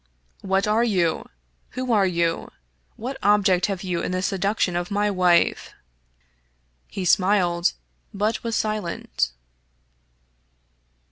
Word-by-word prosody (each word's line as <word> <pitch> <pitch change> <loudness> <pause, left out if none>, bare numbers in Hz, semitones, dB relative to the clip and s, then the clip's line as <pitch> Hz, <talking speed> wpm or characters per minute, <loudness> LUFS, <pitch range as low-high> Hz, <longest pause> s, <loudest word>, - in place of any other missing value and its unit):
"What 195 +1 0
are 215 +2 +3
you? 180 -8 0 0.5
Who 255 -1 -1
are 205 -4 +4
you? 170 -2 -1 0.5
What 260 +4 -5
object 200 -3 +3
have 195 -2 -4
you 180 -3 -2
in - - -3
the 185 0 -1
seduction 195 -1 0
of 175 0 -2
my 205 +1 +1
wife? 180 -3 +2 0.5
" - - -43 0.3
He 190 - -5
smiled, 180 -2 +3 0.4
but 210 +2 -1
was 230 -1 -2
silent. 210 - -2
190 Hz, 120 wpm, -23 LUFS, 175-210 Hz, 0.5 s, are